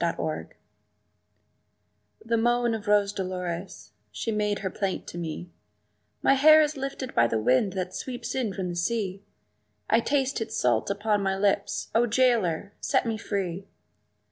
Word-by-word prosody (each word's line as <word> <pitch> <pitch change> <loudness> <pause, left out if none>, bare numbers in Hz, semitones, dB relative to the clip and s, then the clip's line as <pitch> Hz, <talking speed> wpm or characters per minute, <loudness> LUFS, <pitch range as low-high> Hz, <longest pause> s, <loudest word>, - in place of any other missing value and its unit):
Rose 170 -1 +1
Dolores 155 - -3 1.8
THE 230 0 +1
moan 240 +1 +2
of 220 -1 -5
Rose 205 -1 +3
Dolores, 185 -1 -5 0.2
she 225 - -3
made 210 -1 0
her 190 - -1
plaint 195 -2 -2
to - - -8
me, 170 +1 -5 0.7
"My - - +5
hair 310 +3 +7
is 305 -1 +2
lifted 270 -1 -5
by 115 0 +4
the 115 - 0
wind 130 - +2
that 185 -1 -3
sweeps 245 -2 -5
in 245 -6 -1
from 190 -1 -4
the 175 - -4
sea; 195 +1 -1 0.7
I 225 - +6
taste 270 0 0
its 220 0 -3
salt 120 -3 +1
upon 205 +1 0
my 195 -1 0
lips 200 0 0
O 235 +1 +3
jailer, 215 -7 +1
set - - +1
me 225 -1 -1
free!" 195 -2 -3
205 Hz, 160 wpm, -27 LUFS, 180-235 Hz, 1.8 s, hair